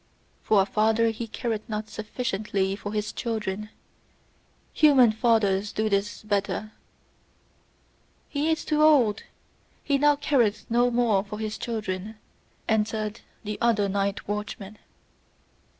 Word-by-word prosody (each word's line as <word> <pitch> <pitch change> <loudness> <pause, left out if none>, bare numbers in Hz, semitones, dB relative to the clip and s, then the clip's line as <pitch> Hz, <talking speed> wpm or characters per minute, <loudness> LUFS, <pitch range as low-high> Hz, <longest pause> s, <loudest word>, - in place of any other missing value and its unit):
"For 205 -3 +4
a - - -4
father 220 +2 +2
he 230 +1 -6
careth 225 -1 -3
not 215 0 -3
sufficiently 210 -3 -2
for 205 0 -6
his 210 0 -2
children: 215 -3 -3 1.0
human 270 -7 +6
fathers 215 -3 +2
do 215 0 -1
this 205 +1 -1
better!" 210 +1 -2 1.6
"He 295 +1 -1
is 320 -1 0
too 305 -1 +1
old! 260 -9 +5 0.6
He 280 -2 +1
now 295 +1 +5
careth 260 -7 +1
no 240 +1 +4
more 235 -5 +2
for 210 0 -7
his 215 0 -4
children," 215 -2 -4 0.5
answered 215 0 -1 0.2
the 210 -1 -5
other 220 -4 +3
night 200 0 -2
watchman. 210 0 -5
215 Hz, 120 wpm, -26 LUFS, 205-235 Hz, 1.6 s, human